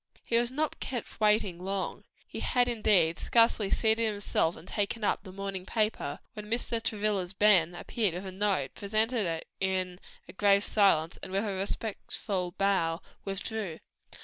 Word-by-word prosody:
He 230 - +1
was 235 0 +1
not 300 +4 -2
kept 245 -3 -5
waiting 210 -5 +2
long; 195 0 -3 0.3
had, 245 -1 +1
indeed, 210 -8 +3
scarcely 230 -3 +3
seated 220 +1 +2
himself 200 -5 0
and 175 - -13
taken 210 +2 -2
up - - +1
the 190 -1 -11
morning 195 -1 -5
paper, 210 -8 -1 0.2
when 210 -1 -8
Mr. 230 0 0
Travilla's 205 -4 -1
Ben 185 -4 +4
appeared 200 -1 -1
with 185 +2 -5
a 190 - -5
note, 190 -8 0
presented 215 +1 +1
it 165 -1 -3
in 185 -1 -1 0.4
grave 200 -1 +4
silence, 185 -7 +3
and - - -7
with 195 +3 0
a 205 - -1
respectful 195 -2 -3
bow, 180 -5 +1 0.3
withdrew. 195 -2 -4
200 Hz, 150 wpm, -30 LUFS, 185-220 Hz, 0.4 s, Ben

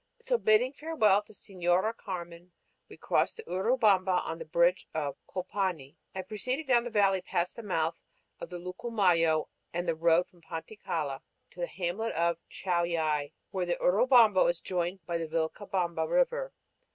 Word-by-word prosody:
So, - - 0
bidding 230 +5 +3
farewell 245 -11 +2
to 210 +1 -18
Señora 190 +2 0
Carmen, 175 -3 -7 0.4
we - - -12
crossed - - +1
the 455 - -8
Urubamba 190 - +2
on 165 +1 -4
the 160 - -6
bridge 170 +3 +2
of 145 -3 -2
Colpani 185 -6 -3 0.2
and 190 -1 -5
proceeded 255 +9 -2
down 245 -3 +3
the - - -3
valley 195 -4 +3
past 180 -1 -2
the 235 - -7
mouth 165 -5 -1 0.4
of - - -7
the 180 - -6
Lucumayo 180 -4 +1 0.2
and 175 +1 -3
the 165 - +2
road 165 +2 +3
from 175 - -24
Panticalla, 160 -4 -4 0.3
to - - -16
the 175 - -1
hamlet 190 +5 -3
of 170 0 +1
Chauillay, 165 -5 0 0.2
where 185 -2 -2
the 175 - +1
Urubamba 215 +1 +5
is 175 -1 -1
joined 180 -1 -3
by 170 0 -2
the 165 - -3
Vilcabamba 170 +2 -1
River. - - +1
180 Hz, 160 wpm, -30 LUFS, 170-215 Hz, 0.4 s, Urubamba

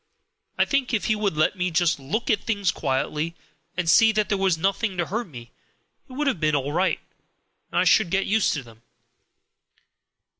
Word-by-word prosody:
I - - +3
think 265 -3 0
if 210 - -2
he 215 - +2
would 210 -3 -1
have - - -11
let 155 +5 +2
me 180 -1 -1
just 170 -2 +1
look 160 - -2
at 210 - +1
things 200 -4 0
quietly, 150 +4 -2 0.4
and 180 -2 -1
see 225 +7 +6
that 215 -1 0
there 200 - +1
was 190 -4 +2
nothing 195 +3 -1
to 175 - 0
hurt 225 +6 -3
me, 120 -6 -11 0.6
it - - -11
would 295 +3 -2
have 270 - 0
been 155 -1 +1
all 140 0 -1
right, 185 +3 +1 0.7
and - - -3
I - - +3
should 220 - +4
have 170 - -8
got 195 0 +2
used 215 +1 +2
to 140 - -4
them. 115 -1 -17
185 Hz, 210 wpm, -24 LUFS, 155-215 Hz, 0.7 s, see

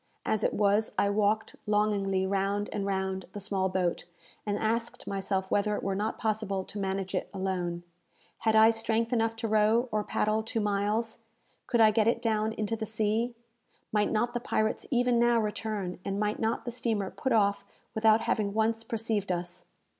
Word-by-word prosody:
As 215 - 0
it - - +1
was, 210 +1 +2
I 200 - +3
walked 210 +1 +1
longingly 200 -2 +1
round 200 +1 -1
and 200 -1 -2
round 190 -1 -2
the 205 - -5
small 190 -1 0
boat, 180 -2 -1 0.4
and 205 0 0
asked 230 +2 -2
myself 195 -1 -2
whether 210 +1 +2
it - - -4
were 195 - 0
not 210 +3 -2
possible 215 -3 -1
to 205 - -8
manage 190 -1 -2
it - - -2
alone. 180 -2 -2 0.6
Had 220 -1 +2
I 220 +1 +7
strength 225 +1 -1
enough 225 -1 +1
to 225 0 -3
row 220 +3 +3
or 215 -1 0
paddle 215 +1 0
two 225 +1 -3
miles? 210 +2 0 0.5
Could 235 - +2
I 215 -1 +7
get 215 0 +2
it 230 - +2
down 220 -1 0
into 215 0 -2
the 220 -1 -4
sea? 220 +2 0 0.6
Might 210 -1 +1
not 235 +2 +1
the 240 - -1
pirates 215 -2 -1
even 245 -2 +2
now 240 0 +4
return, 210 -4 -3
and 195 0 -2
might 210 0 0
not 225 +1 -1
the 240 - -3
steamer 220 -5 -1
put 265 - -3
off 200 -3 +3 0.3
without 220 0 +4
having 210 -2 0
once 225 +1 +1
perceived 220 -3 -2
us? 175 0 -3
215 Hz, 185 wpm, -29 LUFS, 200-225 Hz, 0.6 s, I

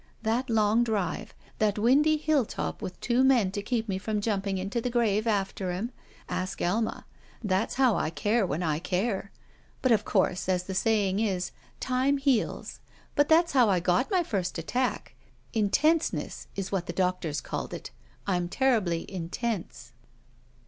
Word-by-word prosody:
That 235 +4 0
long 220 +1 +3
drive. 215 -2 -2 0.2
That 210 -1 +2
windy 285 +8 +4
hilltop 300 -6 -1
with 180 - -6
two 245 +2 +2
men 245 -8 +4
to 205 - -3
keep 230 +1 -1
me 190 -2 -2
from 210 +1 -2
jumping 200 -2 -1
into 195 +5 -2
the 250 - -1
grave 225 -3 +1
^ter 195 -3 -1
him. 205 +8 -3 0.4
Ask 185 0 -3
Alma. 220 +6 -1 0.4
That's 195 +1 0
how 255 -4 +4
I - - 0
care 210 +7 +1
when 175 -1 -1
I 155 -2 0
care. 190 +3 -1 0.5
But, 255 - +3
of 215 -2 +4
course, 190 -3 0
as 180 -1 +1
the 190 - -5
saying 200 -1 +2
is, 190 -5 -1 0.3
'time 260 +2 +1
heals.' 270 -5 0 0.4
But 290 0 +3
that's 335 +2 +4
how 250 -5 +5
I 185 -2 +3
got 180 +7 +1
my 370 -4 +2
first 190 - -2
attack. 245 +10 -2 0.4
'Intenseness' 300 +10 +1
is 195 -1 -4
what 190 -3 -1
the 170 - -3
doctors 180 -5 0
called - - -5
it. - - -7 0.3
I'm 180 -3 0
terribly 210 -10 +1
intense." 180 - -4
210 Hz, 160 wpm, -28 LUFS, 185-240 Hz, 0.5 s, how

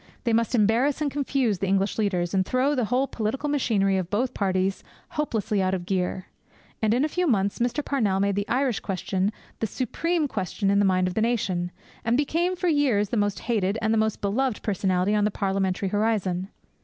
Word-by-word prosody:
They 235 - +1
must 230 +2 +2
embarrass 235 +7 +2
and 295 -2 -1
confuse 270 -7 0
the 195 - -1
English 195 +3 +1
leaders, 180 -4 0
and 190 -1 +3
throw 255 +8 +1
the 250 -5 +1
whole 250 +5 +1
political 245 +4 -3
machinery 205 -9 +2
of 185 -2 -2
both 240 +6 0
parties 190 -1 0 0.3
hopelessly 220 -9 -1
out 185 0 +1
of 175 -2 -5
gear. 185 0 -1 0.6
And 220 -1 +2
in 260 +4 +2
a - - +1
few 360 +3 -1
months 200 -6 +1
Mr. 245 +5 0
Parnell 215 -9 +1
made 200 0 +2
the 205 +1 -1
Irish 255 -3 +1
question 190 +1 -1 0.3
the 225 - 0
supreme 310 - -1
question 195 -2 -1
in 200 - +3
the 205 - +4
mind 185 -1 +2
of 180 - -3
the 220 - 0
nation, 200 -7 0 0.3
and 235 +2 +2
became 335 +5 +1
for 360 0 -2
years 265 - +2
the - - -2
most 205 -2 0
hated 210 -3 0
and 220 0 +1
the - - +2
most 220 -1 0
beloved 225 +4 0
personality 190 -1 +1
on 210 -1 +2
the 210 - +3
parliamentary 195 -1 -1
horizon. 200 -3 0
210 Hz, 205 wpm, -25 LUFS, 195-255 Hz, 0.6 s, the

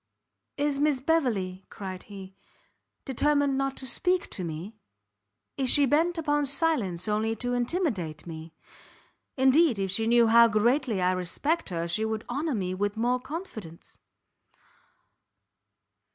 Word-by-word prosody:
"Is 285 -1 0
Miss 290 -2 +2
Beverley," 230 - 0
cried 185 -2 -7
he, 195 -2 -10 0.7
"determined 285 +1 +1
not 275 0 -1
to, 265 - -6
speak 360 +8 0
to 185 - -4
me? 170 +6 -6 0.8
Is 265 -2 +1
she 285 +1 +5
bent 325 +6 +2
upon 295 -2 0
silence 255 - 0
only 215 +1 0
to 245 +1 -3
intimidate 240 - -2
me? 160 -1 -9 0.8
Indeed 265 0 +4
if 195 -1 -2
she 225 +3 +1
knew 235 0 +5
how 235 +1 +7
greatly 230 -1 +1
I 180 - +3
respect 215 - -1
her, 170 -2 -3
she 170 +6 -1
would 220 0 -3
honour 285 +3 -2
me 185 -3 -2
with 205 +3 -2
more 245 +2 +1
confidence." 250 - -9
235 Hz, 135 wpm, -27 LUFS, 190-285 Hz, 0.8 s, how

